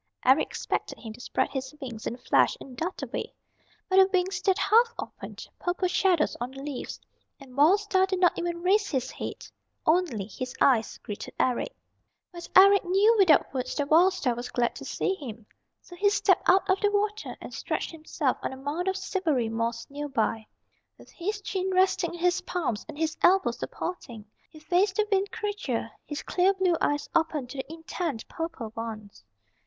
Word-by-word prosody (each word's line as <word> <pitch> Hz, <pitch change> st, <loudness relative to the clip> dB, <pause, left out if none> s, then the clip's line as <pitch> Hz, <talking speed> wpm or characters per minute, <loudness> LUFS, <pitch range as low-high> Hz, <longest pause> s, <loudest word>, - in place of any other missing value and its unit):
Eric 265 Hz, +4 st, +5 dB
expected -, -, -3 dB
him 225 Hz, -2 st, -8 dB
to 235 Hz, -, -12 dB
spread -, -, -1 dB
his 265 Hz, +1 st, -5 dB
wings 240 Hz, -6 st, -6 dB
in -, -, -3 dB
a -, -, -14 dB
flash -, -, +2 dB
and 260 Hz, -, -11 dB
dart 340 Hz, +8 st, -4 dB
away. -, -, -5 dB, 0.5 s
But 375 Hz, -, +2 dB
the 380 Hz, 0 st, +8 dB
wings 370 Hz, 0 st, +1 dB
stayed 385 Hz, -2 st, +1 dB
half 465 Hz, +2 st, +4 dB
open, -, -, -8 dB, 0.2 s
purple 360 Hz, +1 st, 0 dB
shadows 360 Hz, -2 st, +2 dB
on 245 Hz, -, -2 dB
the 270 Hz, +1 st, -9 dB
leaves, 285 Hz, -3 st, -5 dB, 0.4 s
and 265 Hz, -3 st, -14 dB
Wild 325 Hz, +9 st, +5 dB
Star 380 Hz, -2 st, +2 dB
did 380 Hz, -1 st, -1 dB
not 355 Hz, -2 st, +4 dB
even 345 Hz, 0 st, -3 dB
raise 400 Hz, +3 st, +3 dB
his 265 Hz, -4 st, -2 dB
head. -, -, -6 dB, 0.4 s
Only 310 Hz, -, +2 dB
his 250 Hz, +5 st, -6 dB
eyes 235 Hz, -5 st, +3 dB
greeted 205 Hz, -, -7 dB
Eric. 255 Hz, -, 0 dB, 0.6 s
But 345 Hz, -1 st, -9 dB
Eric 395 Hz, +1 st, +8 dB
knew 395 Hz, +5 st, +4 dB
without 335 Hz, -9 st, +5 dB
words 255 Hz, -2 st, -3 dB
that 290 Hz, 0 st, -2 dB
Wild 355 Hz, +4 st, +6 dB
Star 295 Hz, -10 st, 0 dB
was 240 Hz, +1 st, -6 dB
glad 240 Hz, -1 st, 0 dB
to -, -, -8 dB
see 385 Hz, -, -1 dB
him. 235 Hz, -, -8 dB, 0.4 s
So 355 Hz, -, -12 dB
he 405 Hz, +3 st, +3 dB
stepped 405 Hz, -, +2 dB
up 380 Hz, +2 st, +5 dB
out 380 Hz, -1 st, +3 dB
of -, -, -17 dB
the 410 Hz, -, +4 dB
water 420 Hz, +1 st, -2 dB
and -, -, -9 dB
stretched -, -, -3 dB
himself 310 Hz, -4 st, -2 dB
on -, -, -3 dB
a 265 Hz, -, -8 dB
mound 295 Hz, +7 st, -3 dB
of 380 Hz, 0 st, +1 dB
silvery 325 Hz, -, 0 dB
moss 230 Hz, +1 st, -2 dB
near 290 Hz, +1 st, -5 dB
by. 225 Hz, -3 st, -1 dB, 0.5 s
With -, -, -17 dB
his 410 Hz, +4 st, -4 dB
chin 380 Hz, -1 st, -2 dB
resting 370 Hz, -2 st, +2 dB
in -, -, -9 dB
his 360 Hz, 0 st, +2 dB
palms 280 Hz, -, -2 dB
and -, -, -8 dB
his 320 Hz, 0 st, -1 dB
elbows 380 Hz, +2 st, +4 dB
supporting, 240 Hz, -, -6 dB, 0.2 s
he -, -, -15 dB
faced 365 Hz, +5 st, +1 dB
the 430 Hz, +1 st, +1 dB
Wind 390 Hz, 0 st, +2 dB
Creature, 400 Hz, -, -3 dB, 0.2 s
his 295 Hz, 0 st, -5 dB
clear 375 Hz, +2 st, +2 dB
blue 370 Hz, -2 st, +2 dB
eyes 290 Hz, 0 st, 0 dB
open 315 Hz, -4 st, +1 dB
to 255 Hz, +3 st, -10 dB
the 265 Hz, -, -5 dB
intent 325 Hz, -5 st, -4 dB
purple 325 Hz, -10 st, -5 dB
ones. 215 Hz, -, -7 dB
330 Hz, 195 wpm, -27 LUFS, 255-380 Hz, 0.6 s, the